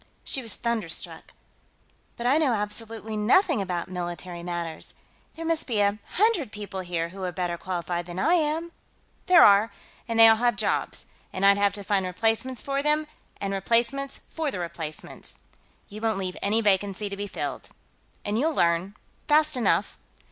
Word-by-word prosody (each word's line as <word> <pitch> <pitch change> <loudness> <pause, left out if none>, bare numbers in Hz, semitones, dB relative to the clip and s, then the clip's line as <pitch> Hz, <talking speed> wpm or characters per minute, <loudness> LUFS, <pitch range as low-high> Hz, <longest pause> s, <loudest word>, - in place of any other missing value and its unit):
She 270 - -1
was 230 -3 -2
thunderstruck. 225 -8 -3 0.9
"But 235 - -5
I 270 +5 +4
know 285 -6 +2
absolutely 220 +1 -4
nothing 260 - +3
about 180 -3 -3
military 175 -1 -5
matters. 170 -2 -5 0.4
There 330 - -6
must 330 -1 0
be 225 -5 0
a 205 +1 +2
hundred 400 - +2
people 205 -2 -6
here 175 -2 -2
who 190 +2 -8
are 180 - -2
better 175 0 -2
qualified 175 -1 -4
than 175 0 -7
I 320 - +3
am...." 325 0 0 0.6
"There 365 -2 +8
are, 205 +2 +5 0.4
and 230 -1 -1
they 225 - +11
all 225 0 +6
have 240 0 +2
jobs, - - -1 0.3
and 190 +1 0
I'd 200 0 +6
have 200 -1 +3
to 200 0 -7
find 195 -1 +1
replacements 225 +7 0
for 275 0 -1
them, 300 +1 +1 0.3
and 195 -1 -2
replacements 235 +7 0
for 320 -2 -2
the 235 - -5
replacements. 165 -3 -7 0.5
You 215 +1 -10
won't 220 -2 +1
leave 185 -2 -3
any 215 +3 +2
vacancy 205 0 +1
to 200 - -5
be 205 +1 -4
filled. - - -5 0.6
And 210 +2 0
you'll 315 +3 +1
learn, 170 +4 +1 0.3
fast 305 0 +4
enough." 245 - +1
210 Hz, 170 wpm, -26 LUFS, 185-255 Hz, 0.9 s, they